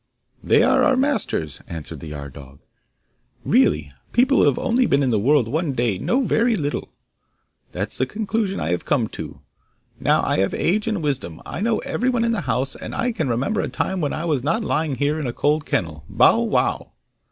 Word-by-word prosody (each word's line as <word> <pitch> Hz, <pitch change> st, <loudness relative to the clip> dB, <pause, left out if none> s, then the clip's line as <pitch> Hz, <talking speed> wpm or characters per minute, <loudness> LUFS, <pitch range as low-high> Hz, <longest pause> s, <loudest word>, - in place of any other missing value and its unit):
'They -, -, +4 dB
are -, -, +4 dB
our 265 Hz, -, +4 dB
masters,' 260 Hz, -, -1 dB
answered 80 Hz, -2 st, -7 dB
the 80 Hz, -, -9 dB
yard 70 Hz, -3 st, -7 dB
dog. 70 Hz, 0 st, -12 dB, 0.9 s
'Really 75 Hz, -1 st, +2 dB, 0.2 s
people 260 Hz, +3 st, +4 dB
who -, -, +5 dB
have -, -, +3 dB
only 250 Hz, 0 st, +2 dB
been 140 Hz, 0 st, +2 dB
in 130 Hz, -, +1 dB
the 110 Hz, -, +2 dB
world 130 Hz, +2 st, +3 dB
one 155 Hz, +3 st, -1 dB
day 120 Hz, -6 st, 0 dB
know 255 Hz, +3 st, +1 dB
very 235 Hz, 0 st, +2 dB
little.' 145 Hz, -6 st, -3 dB, 0.8 s
That's 100 Hz, +4 st, -4 dB
the 130 Hz, -, +1 dB
conclusion 210 Hz, -, -2 dB
I 80 Hz, -, -1 dB
have 90 Hz, -, -1 dB
come 125 Hz, -7 st, +1 dB
to. -, -, -8 dB, 0.6 s
Now -, -, +2 dB
I -, -, +1 dB
have 95 Hz, -, +1 dB
age 210 Hz, +6 st, 0 dB
and 210 Hz, -7 st, -1 dB
wisdom; 125 Hz, -, -2 dB
I -, -, -5 dB
know 225 Hz, +1 st, +1 dB
everyone 245 Hz, -1 st, 0 dB
in 230 Hz, -, +1 dB
the 225 Hz, -, -1 dB
house, 130 Hz, 0 st, -1 dB
and -, -, -7 dB
I 245 Hz, +1 st, 0 dB
can 160 Hz, -, -2 dB
remember 135 Hz, -, 0 dB
a -, -, -2 dB
time 190 Hz, -1 st, -2 dB
when 145 Hz, -, 0 dB
I 160 Hz, -, -3 dB
was 150 Hz, -6 st, 0 dB
not 165 Hz, +10 st, 0 dB
lying 150 Hz, -6 st, 0 dB
here 145 Hz, +4 st, 0 dB
in 145 Hz, -, -3 dB
a 120 Hz, -, -3 dB
cold 150 Hz, +2 st, 0 dB
kennel. 80 Hz, -4 st, -2 dB
Bow -, -, +4 dB
wow! -, -, 0 dB
145 Hz, 205 wpm, -22 LUFS, -, 0.9 s, who